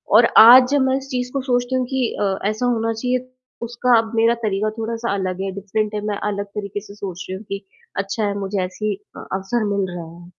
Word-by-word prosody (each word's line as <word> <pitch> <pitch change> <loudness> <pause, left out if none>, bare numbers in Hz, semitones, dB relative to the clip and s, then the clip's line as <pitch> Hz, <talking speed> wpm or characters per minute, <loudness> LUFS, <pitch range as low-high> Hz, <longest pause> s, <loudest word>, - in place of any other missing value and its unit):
और 230 +2 +8
आज 250 +3 +10
जब 285 -2 +3
मैं 260 - +2
इस 270 0 -7
चीज़ 250 0 -2
को 275 - -1
सोचती 245 +1 +1
हूँ 255 -1 +1
कि 260 -3 0
अ, 195 -1 +1
ऐसा 215 +3 -2
होना 230 -2 +1
चाहिए, 250 +2 -2 0.3
उसका 235 +1 +2
अब 225 0 0
मेरा 230 +1 +4
तरीका 210 +1 0
थोड़ा-सा 230 0 -2
अलग 190 -1 -2
है, 195 0 -2
डिफरेंट 210 +2 -2
है, 210 - -2
मैं 205 -1 -1
अलग 200 0 -3
तरीके 205 -1 -4
से 200 -1 -12
सोच 185 -3 -6
रही 190 - -3
हूँ 210 - -11
कि 200 0 -5 0.3
अच्छा 195 +2 -2
है, 200 - 0
मुझे 195 0 -2
ऐसे 190 +3 -6
ही 210 -2 0 0.2
अ, - - -9
अवसर 195 +5 -1
मिल 195 -2 0
रहा 170 -1 -6
है। 175 - -13
215 Hz, 235 wpm, -21 LUFS, 200-245 Hz, 0.3 s, आज